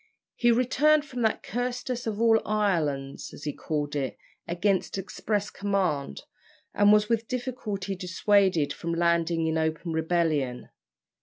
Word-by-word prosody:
He 240 - +3
returned 290 +5 +3
from 250 -4 -6
that 220 -2 +1
"cursedest 245 +1 -3
of 215 -1 -2
all 225 -1 +4
islands," 160 -10 -1
as - - -12
he 150 - -2
called 150 -2 -3
it, 135 -3 -2 0.3
against 185 +3 0
express 205 +1 -2
command, 185 - -1 0.5
and 205 0 +5
was 210 0 +5
with 230 -1 0
difficulty 220 -6 -3
dissuaded 185 -4 +2
from 170 0 -3
landing 170 -1 +1
in 160 0 0
open 160 +1 -2
rebellion. 160 -6 0
195 Hz, 135 wpm, -27 LUFS, 160-225 Hz, 0.5 s, and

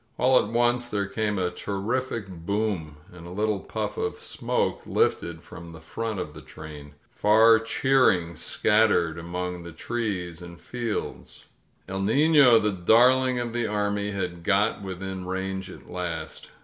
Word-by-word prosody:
All 130 0 +5
at - - -5
once 120 +1 +1
there 100 -2 -1
came 105 +1 -2
a 90 -1 0
terrific 110 +4 -3
boom, 95 -3 -3 0.2
and 85 -1 -11
a - - -9
little 105 +1 0
puff - - -4
of - - -2
smoke - - -2
lifted 85 -1 0
from 85 -1 -11
the 80 - -10
front 110 +6 -4
of 75 -4 -5
the 75 - -10
train. 75 -2 -11 0.2
Far 110 +2 +5
cheer 130 +3 +3
ing 85 -3 -1
scattered 95 -3 +2
among 90 +1 -4
the 85 0 -9
trees 90 -3 -4
and 85 -1 -10
fields. 120 -3 -5 0.4
^^1 95 +1 -3
Nino," 140 +1 +6
the 105 -1 +1
darling 125 +7 +4
of 120 -1 -3
the 120 -1 0
army, 105 -1 -1
had 90 -4 -4
got 105 +4 +2
within 95 -1 -5
range 95 +1 -3
at - - -12
last. 85 -2 -5
100 Hz, 155 wpm, -26 LUFS, 90-115 Hz, 0.4 s, Nino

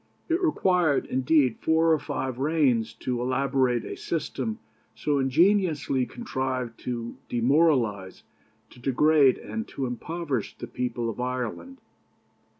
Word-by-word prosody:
It 335 +3 +1
required, 180 - +2
indeed, 130 -1 +2
four 160 +1 +3
or 155 - +2
five 130 -3 -4
reigns 135 -7 +2
to 125 -1 -2
elaborate 130 -1 +1
a - - -5
system 220 +7 -3 0.4
so 145 -2 0
ingeniously 150 -2 +2
contrived 130 - -4
to 120 -2 -4
demoralize, 120 - +1 0.5
to - - -16
degrade, 140 +2 +4
and 225 0 -5
to 135 - -4
impoverish 140 +1 -4
the - - -6
people 120 0 -3
of 115 +1 -5
Ireland. 125 - -4
135 Hz, 120 wpm, -26 LUFS, 125-160 Hz, 0.5 s, degrade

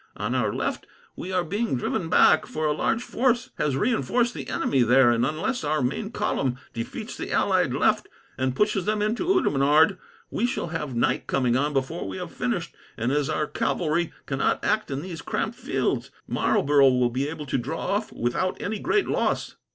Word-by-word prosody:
"On - - -2
our - - +1
left - - -3 0.3
we 185 - -6
are 180 -1 +1
being 200 - -1
driven 165 +6 -2
back, 155 - +5
for 155 0 -3
a 150 - +2
large 225 +9 0
force 245 -1 0
has 145 -3 +1
reinforced 240 - +1
the 140 -5 -7
enemy 135 - +1
there, 120 +1 +5
and 120 0 +1
unless 155 - -1
our 150 -2 0
main 205 - -2
column 130 - -1 0.2
defeats 115 -1 -5
the - - -6
allied - - +2
left, - - +2 0.3
and 130 -1 -1
pushes 210 -1 +1
them 210 0 +1
into 230 +11 -1
Oudenarde, 160 - +3 0.3
we 240 - +1
shall 245 -9 -3
have 150 -6 -4
night 115 - 0
coming 125 -3 +1
on 145 +3 +1
before 135 -7 -2
we 95 -1 -5
have - - -6
finished; - - -2 0.2
and, 115 +3 0
as 145 -1 +1
our 150 - 0
cavalry 155 +2 -1
cannot 135 -1 0
act 215 -5 +1
in 140 +1 -3
these 175 -3 -6
cramped - - -2
fields, - - -1 0.2
Marlborough 140 -1 +3
will 125 -1 +2
be 135 +4 -1
able 150 -1 -6
to 135 - -1
draw 150 +7 -4
off 205 +2 -1
without 120 +10 -1
any 210 0 -3
great 415 - +1
loss." - - -1
150 Hz, 190 wpm, -25 LUFS, 135-205 Hz, 0.3 s, back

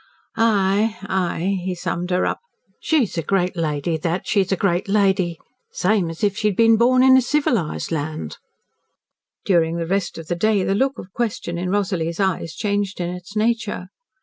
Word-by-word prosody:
"Ay! 210 -1 +2
Ay!" 190 0 -1
he 185 0 -2
summed 175 +1 -3
her 180 0 +1
up. - - -1 0.4
"She's 260 - +1
a - - 0
great 180 +2 0
lady 160 -1 -1
that 170 +3 -2
she's 200 -2 +1
a - - +3
great 180 -1 0
lady 190 -4 +2 0.3
same 185 -2 +1
as 165 +3 -8
if 200 -1 +2
she'd 210 -3 0
been 225 0 +6
born 255 +3 +4
in 260 0 +7
a - - +5
civilised 245 - 0
land." 150 - -4 1.1
During 170 -3 +2
the 170 -1 -2
rest 195 +2 -1
of 165 - -7
the 175 - -2
day 205 +2 +2
the 195 - +1
look 270 +6 +1
of 185 - -10
question 205 -7 -3
in 180 +1 -2
Rosalie's 180 -4 -1
eyes 180 -4 -1
changed 205 -2 -2
in 175 0 -2
its 180 +3 -9
nature. 215 -4 -1
190 Hz, 175 wpm, -21 LUFS, 170-210 Hz, 1.1 s, in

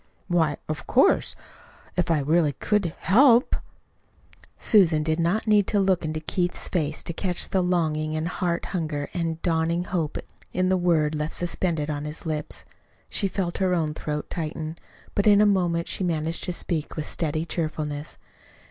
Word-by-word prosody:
"Why, 160 -5 +2
of 155 -1 -5
course, - - +3 0.6
if 180 -2 0
I 160 -3 +3
really 155 +1 +2
could 200 -3 0
HELP 245 +4 +5 0.5
" - - -34 0.3
Susan 170 -8 +4
did 160 +1 0
not 175 +6 +1
need 210 -3 +4
to 205 - +2
look 190 -3 +2
into 155 0 -2
Keith's 175 +3 -2
face 155 -4 -1
to 170 - -4
catch 180 0 0
the 190 - +2
longing 155 -4 0
and 155 +1 -1
heart 175 -1 -1
hunger 155 -5 -2
and 165 -2 -2
dawning 165 0 +1
hope 170 -4 -2 0.4
in 185 0 +1
the 190 - +3
word 165 -4 +2
left 150 +1 -2
suspended 170 -3 -1
on 145 0 -4
his 150 +3 -6
lips. 155 -2 -4 0.4
She 200 - 0
felt 185 -2 -2
her 185 -2 +2
own 155 -3 0
throat 150 -1 -4
tighten; 155 -1 -4 0.4
but 200 - +1
in 205 -1 +7
a 210 - +6
moment 175 -4 +1
she - - -2
managed 165 -1 -1
to 180 - -2
speak 165 -3 -3
with 155 - -3
steady 155 0 -1
cheerfulness. 155 -3 -3
170 Hz, 170 wpm, -25 LUFS, 155-180 Hz, 0.6 s, in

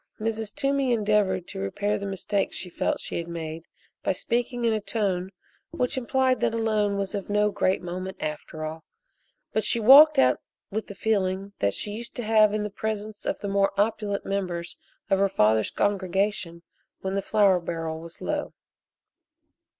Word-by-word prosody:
Mrs. 220 -1 -2
Toomey 275 -3 +1
endeavored 205 -5 +1
to - - -6
repair 200 - -1
the 200 - -4
mistake 195 +1 -1
she 180 - -6
felt - - -1
she - - -4
had 170 - -5
made 165 -1 -6 0.4
by - - +1
speaking 240 +5 -1
in 230 - +3
a 215 - -1
tone 195 -4 -1 0.4
which 250 - -1
implied 260 0 +1
that 230 -1 +1
a - - 0
loan 215 -3 +1
was 195 +1 -2
of 200 -1 -4
no 210 0 +2
great 190 -1 +1
moment 185 +2 -5
after 155 +1 -5
all, 160 +1 -6 0.7
but 220 - +1
she 235 - +2
walked 280 +7 +9
out 125 -1 +4 0.3
with 215 +2 -3
the 205 - -9
feeling 195 -1 0
that 100 -1 +1
she 205 - -3
used 230 +3 -7
to 240 - -4
have 215 -1 +5
in 210 0 -1
the 210 - -4
presence 215 0 -4
of - - 0
the 205 - -3
more 195 0 +1
opulent 210 -1 0
members 180 -4 -3 0.4
of 195 - +4
her 200 0 +3
father's 110 - +3
congregation 190 -3 -1 0.4
when 190 0 -3
the 200 - 0
flour 200 -3 +3
barrel 165 -2 -4
was 170 +1 -10
low. - - -2
200 Hz, 180 wpm, -26 LUFS, 180-220 Hz, 0.7 s, walked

